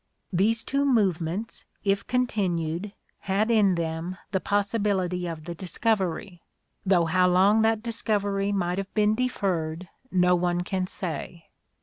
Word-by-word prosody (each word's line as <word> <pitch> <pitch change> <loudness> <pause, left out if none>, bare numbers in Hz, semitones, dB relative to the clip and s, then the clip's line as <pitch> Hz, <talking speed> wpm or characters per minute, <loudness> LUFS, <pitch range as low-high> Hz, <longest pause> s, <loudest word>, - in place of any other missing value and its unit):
These 220 +5 +2
two 280 +1 0
movements, 200 - 0 0.2
if 200 0 0
continued, 190 -7 -1 0.3
had 205 +4 0
in 205 -5 +4
them 165 +2 -3
the 190 - +1
possibility 200 -3 0
of 160 -2 -6
the 170 - -4
dis 180 +1 -9
covery; 195 -4 0 0.4
though 185 -3 +3
how 180 +2 +3
long 195 +4 +4
that 220 0 +2
discovery 205 -3 -1
might 180 -2 0
have 195 0 -5
been 210 0 +3
deferred, 185 -8 -2 0.2
no 180 -1 +4
one 175 0 +1
can 185 0 -2
say. 170 -2 -6
190 Hz, 135 wpm, -26 LUFS, 175-210 Hz, 0.4 s, in